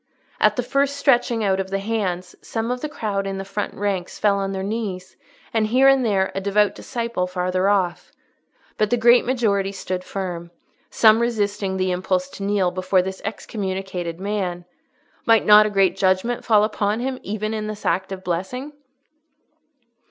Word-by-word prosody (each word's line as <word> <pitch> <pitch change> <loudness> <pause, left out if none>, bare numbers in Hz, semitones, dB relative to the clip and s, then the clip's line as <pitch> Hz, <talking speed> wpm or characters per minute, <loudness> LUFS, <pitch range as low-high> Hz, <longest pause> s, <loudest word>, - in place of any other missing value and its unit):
At - - +4
the 250 - -1
first 275 +3 0
stretching 245 -5 +2
out 195 -1 +1
of 190 0 -3
the 195 - -1
hands 195 -4 -3
some 225 +1 -3
of 250 0 -3
the 305 - -3
crowd 200 -8 -3
in 195 0 -3
the 195 - -5
front 200 +1 -4
ranks 195 -3 -2
fell 200 -1 +2
on 195 0 -2
their 190 -1 -3
knees, 195 -3 -4 0.4
and 220 -1 +2
here 255 +4 +4
and 270 -1 +5
there 195 -4 +1
a 195 - -3
devout 205 +1 +2
disciple 235 -7 -3
farther 185 +1 0
off; 185 -4 0 0.7
but 215 -1 +2
the 245 - +2
great 240 +1 +5
majority 205 -6 +1
stood 185 -2 -4
firm, 180 -3 -5 0.4
some 220 0 +5
resisting 205 -4 -1
the 185 0 0
impulse 185 0 -1
to 195 - -8
kneel 195 -3 +1
before 185 0 +1
this 190 0 -6
excommunicated 190 -5 -4
man 190 -3 -3 0.6
(might 225 -1 +5
not 210 0 +8
a - - -2
great 195 -3 +2
judgment 190 +5 +1
fall 215 -2 +4
upon 210 0 0
him 260 +1 -3
even 215 +1 -3
in 215 -1 -3
this 215 -1 -7
act 190 +1 0
of 190 -1 -6
blessing?) 190 - -3
200 Hz, 175 wpm, -22 LUFS, 190-225 Hz, 0.7 s, not